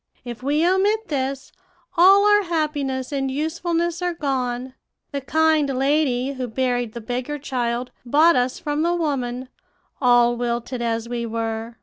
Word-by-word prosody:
If 240 -1 -7
we 295 +5 +1
omit 405 +4 +1
this, 270 -2 -3 0.4
all 385 +4 +6
our 415 0 +5
happiness 295 -5 -2
and 270 -2 -1
usefulness 335 +4 -1
are 355 -1 -1
gone. 255 -4 -2 0.4
The 280 -2 -3
kind 315 +1 +2
lady 270 -2 +1
who 255 -2 -4
buried 245 -1 -1
the 235 - -6
beggar 250 +6 -3
child 250 -3 -2
bought 300 +7 +4
us 250 0 0
from 295 0 -2
the 345 +2 +1
woman, 260 -6 -2 0.5
all 240 -1 +4
wilted 240 +1 -3
as 230 -1 -1
we 235 -1 -3
were. 225 0 -4
265 Hz, 145 wpm, -22 LUFS, 245-315 Hz, 0.5 s, all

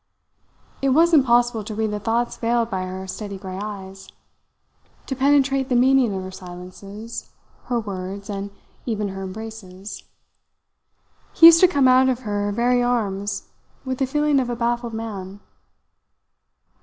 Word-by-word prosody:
It 275 - +2
was 330 +6 +4
impossible 240 -5 +4
to 215 +1 -6
read 220 0 -1
the 210 - -3
thoughts 230 +3 -1
veiled 235 0 0
by 190 -1 -1
her 190 +1 -6
steady 200 +1 -6
grey 190 0 -7
eyes, 195 -2 -8 1.0
to 265 - -3
penetrate 275 0 +2
the 250 - +1
meaning 255 -1 +4
of 190 - -4
her 185 - -7
silences, 185 +5 -9 0.4
her 240 -1 0
words, 195 -1 -6
and 200 -1 -4 0.4
even 210 -3 -1
her 195 0 -6
embraces. 195 -1 -8 1.3
He 330 - +7
used 330 0 +10
to 365 - +7
come 280 -7 +3
out 255 +1 +5
of 255 -1 -1
her 205 -3 -2
very 245 +3 +2
arms 205 -5 -1 0.4
with 260 -1 -3
the 265 - +1
feeling 295 +1 +2
of 250 -2 -1
a 240 - -2
baffled 235 0 -1
man. 200 -3 -6
225 Hz, 150 wpm, -22 LUFS, 195-255 Hz, 1.3 s, used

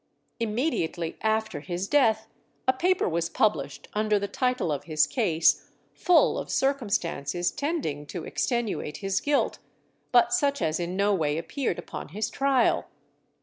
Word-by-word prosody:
Immediately 210 - -1
after 220 -5 0
his 175 +4 -4
death 220 -6 +3 0.4
a 260 - +5
paper 360 +7 +1
was 170 0 -1
published 215 -1 0
under 215 0 +2
the 200 0 -2
title 250 - 0
of 145 - -3
his 155 -2 +3
case, 170 -10 +2 0.2
full 355 -2 +3
of - - -6
circumstances 180 - 0
tending 280 - -3
to 170 0 -6
extenuate 235 - -2
his 195 -1 -1
guilt 290 -1 +1 0.5
but 240 -1 +5
such 280 +3 +2
as 155 +2 0
in 175 +1 -3
no 200 +1 +3
way 155 -5 0
appeared 205 - -2
upon - - -7
his 210 +7 -3
trial. 270 -3 +2
210 Hz, 145 wpm, -27 LUFS, 170-255 Hz, 0.5 s, a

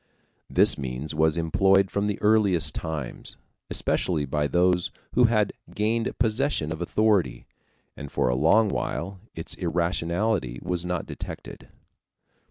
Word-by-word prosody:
This - - +4
means 65 +3 -4
was 80 0 +2
employed 95 +4 +3
from 100 +1 0
the 105 - -2
earliest 105 -5 +3
times, 80 -6 -4 0.3
especially 80 -5 0
by 75 +2 0
those 90 +3 +2 0.2
who 125 - +5
had 110 -3 +2 0.2
gained 110 +2 0
possession 115 - 0
of 80 - -8
authority, 90 - +1 0.5
and 70 -1 -8
for - - +1
a 60 - +2
long 85 - +4
while 95 +2 -3 0.2
its 80 - -4
irrationality 85 - -1
was 90 -1 -2
not 90 -3 -2
detected. - - -9
90 Hz, 130 wpm, -25 LUFS, 80-105 Hz, 0.5 s, who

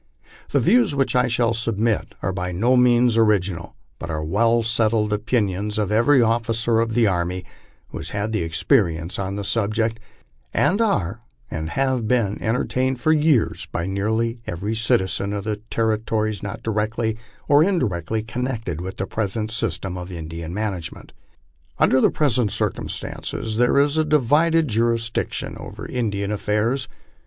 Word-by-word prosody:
The - - +2
views 215 -4 +3
which 135 -2 +1
I 125 0 +4
shall 120 -1 +1
submit 115 -1 -1
are 95 - 0
by 90 -1 -3
no 115 +9 +2
means 120 -1 +4
original, 95 -6 +1 0.2
but 85 - -6
are 75 -1 -2
well 115 +8 +2
settled 110 -2 +1
opinions 105 -2 -1
of 105 -2 0
every 120 +4 +4
officer 115 0 +1
of 115 -1 0
the 120 -1 +4
army 90 -1 -1 0.4
who - - -7
has - - -5
had 105 +2 -2
experience 85 - +1
on 95 0 -3
the 100 - -3
subject, 110 +2 0 0.6
and 200 +5 +2
are 110 - 0 0.3
and 80 0 -3
have 130 0 0
been 110 -4 +1
entertained 130 +3 0
for 155 +6 +3
yeara 145 - +2
by 85 - -2
nearly 110 +5 -1
every 100 +6 -3
citizen 100 -3 0
of 100 -1 -3
the 105 0 -2
territories 110 -2 0
not 100 - -6
directly 110 +1 -1 0.3
or 145 +2 +6
indirectly 110 - 0
connected 115 - -3
with 95 +1 -6
the 95 - -2
present 110 +1 -2
sys 110 -7 -1
tem 95 -1 -5
of 90 +1 -7
Indian 80 -1 -6
management. 95 -4 -5 0.6
Under 130 - +4
present 125 -7 +1
circumstances 110 -1 -3
there 125 +3 +3
is 145 +2 +3
a - - +4
divided 155 +3 +3
jurisdiction 115 0 -1
over - - -8
Indian 100 -5 -2
affairs. 105 +5 0
110 Hz, 150 wpm, -22 LUFS, 100-120 Hz, 0.6 s, or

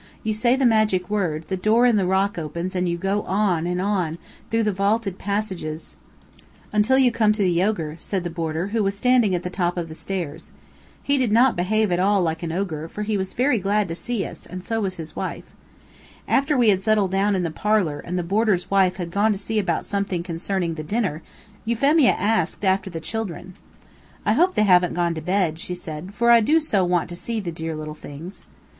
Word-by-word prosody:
"You 220 - 0
say 240 +4 +2
the 265 -1 +1
magic 215 -5 +2
word, 165 -7 -1
the 190 - -1
door 215 +6 +3
in 240 -2 +4
the 195 -3 +1
rock 190 0 +1
opens 170 +4 -4
and 180 -1 0
you 170 - -1
go 195 +3 0
on, 185 -5 0
and 180 0 -1
on, 185 -5 -1 0.3
through 225 0 +1
the 210 - +1
vaulted 200 0 0
passages 190 -6 -4 0.4
" - - -27
"Until 215 +5 +3
you 260 -2 +5
come 215 -2 +3
to 210 -1 0
the 175 -2 +2
ogre," 165 -7 -1
said 190 -3 -3
the 175 - -4
boarder, 165 +2 -3
who 225 +1 0
was 195 -1 0
standing 240 -4 +3
at 175 - -3
the 180 - -3
top 180 -1 -1
of 170 -2 -3
the - - -7
stairs. 165 -3 -5 0.5
He 280 0 +1
did 245 -5 +1
not 240 +3 +4
behave 210 +3 +1
at 175 - +1
all 195 0 +3
like 160 -1 -2
an 170 -2 -3
ogre, 165 -3 -3
for 210 +5 -5
he 210 0 -1
was 190 -1 -3
very 250 -1 +2
glad 200 +1 +1
to - - -2
see 225 +4 -3
us, - - -10
and 185 0 -7
so 225 +1 -2
was 190 -2 -2
his 160 -2 -7
wife. - - -4 0.8
After 280 +1 +2
we 240 -3 +5
had 190 -2 +3
settled 210 -2 +2
down 195 +1 +2
in 185 - 0
the 165 - -2
parlor 185 -5 0
and 180 +4 -4
the 180 - -1
boarder's 195 -1 0
wife 190 -2 +3
had 175 -3 -5
gone 205 +4 +2
to - - -4
see 215 +2 -1
about 200 - -1
something 200 -3 -2
concerning 175 0 -2
the 155 -1 -6
dinner, 185 -3 -1 0.4
Euphemia 275 +5 +3
asked 205 -3 0
after 190 0 +1
the 165 -2 -5
children. 185 0 -5 0.7
"I - - +3
hope 365 +2 +3
they 215 - +3
haven't 180 -3 +4
gone 175 -1 +1
to 160 - -5
bed," 180 -2 0
she 180 -1 -4
said, 175 +2 -8
"for 235 +2 +3
I 235 - +8
do 305 +9 +4
so 210 -11 +1
want 175 -1 +1
to 175 - -6
see 225 +5 -3
the 180 -5 -4
dear 160 0 -5
little 155 0 -6
things." 155 +5 -10
190 Hz, 225 wpm, -23 LUFS, 175-215 Hz, 0.8 s, I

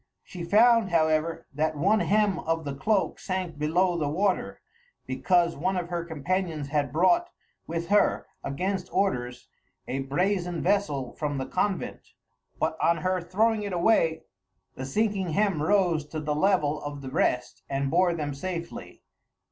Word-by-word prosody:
She 180 -2 -8
found, 225 +3 +5
however, 160 -1 +1
that 155 +2 -1
one 205 +8 +3
hem 210 -3 +2
of 165 0 -2
the 140 - -3
cloak 195 +9 0
sank 185 -5 -4
below 170 +3 +1
the 150 -2 0
water, 190 +5 0 0.5
because 170 +6 +2
one 185 +5 -1
of 175 -1 -3
her 175 -1 -2
companions 165 -1 -2
had 145 -3 0
brought 340 - +3 0.4
with 170 +1 -4
her, 205 0 +3 0.2
against 185 +7 -3
orders, 125 -11 -1 0.4
a 135 - -2
brazen 175 +5 -1
vessel 150 -10 0
from 145 -2 -3
the 130 - -2
convent; 190 +7 -3 0.5
but 160 - 0
on 170 - +3
her 185 0 +1
throwing 215 +5 +1
it 200 -2 -4
away, 170 -3 +2 0.5
the 130 - -6
sinking 195 0 0
hem 195 -4 +1
rose 175 -2 +2
to 155 - -5
the 150 -1 -2
level 155 -3 +1
of 145 -1 -6
the 130 - -6
rest 125 -1 0
and 135 0 -1
bore 175 +1 +3
them 145 -3 -3
safely. 170 +3 -6
170 Hz, 155 wpm, -27 LUFS, 150-190 Hz, 0.5 s, found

